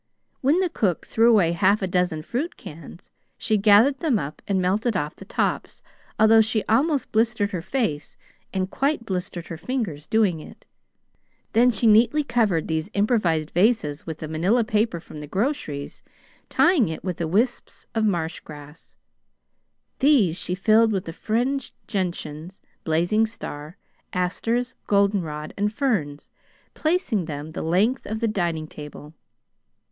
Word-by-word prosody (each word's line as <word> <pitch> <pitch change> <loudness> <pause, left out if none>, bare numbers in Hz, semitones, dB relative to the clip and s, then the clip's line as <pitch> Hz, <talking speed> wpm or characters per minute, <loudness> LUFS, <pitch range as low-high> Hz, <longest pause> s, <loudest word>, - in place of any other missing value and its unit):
When 295 +8 +3
the 365 - +1
cook 190 - -1
threw 230 +1 +3
away 195 -8 +4
half 195 +4 +2
a - - 0
dozen 180 -4 0
fruit 275 - -3
cans, 165 +3 -12 0.3
she 215 - 0
gathered 215 +7 +5
them 295 -9 +1
up 150 -4 -6
and 195 -2 +1
melted 200 +4 +1
off 150 -3 -3
the - - -12
tops, - - -2 0.3
although 220 +1 +6
she 220 0 +1
almost 275 +5 +1
blistered 220 -2 +1
her 180 -5 -3
face 175 - -2 0.3
and 190 0 -2
quite 275 -3 0
blistered 180 -3 -4
her 165 - -7
fingers 170 - -4
doing 205 -7 +2
it. - - -13 0.9
Then 240 +2 +5
she 235 -1 0
neatly 230 +7 +5
covered 225 - +1
these 160 +3 -2
improvised 195 -8 +1
vases 175 -8 +1
with 160 -2 -5
the 155 - -6
Manila 180 +10 +1
paper 215 -4 0
from 160 - -12
the 150 0 -7
groceries, 190 - -3 0.5
tying 315 - +3
it 160 - -6
with 180 -2 -4
wisps 205 +10 -1
of 225 - 0
marshgrass. 160 -5 -4 1.0
These 260 - +4
she 180 - -2
filled 220 +3 +4
with 180 -4 -4
fringed 245 +5 -2
gentians, 175 -3 -4 0.2
blazing 175 +8 +2
star, 155 -7 -8 0.4
asters, 230 +7 -1
goldenrod, 190 -7 0
and 205 +1 0
ferns, 200 - -2 0.4
placing 310 - 0
them 150 0 -6
the - - -5
length 205 +11 +1
of 220 +1 -3
the 230 - 0
dining 170 -7 -1
table. 150 0 -10
200 Hz, 145 wpm, -24 LUFS, 165-230 Hz, 1.0 s, although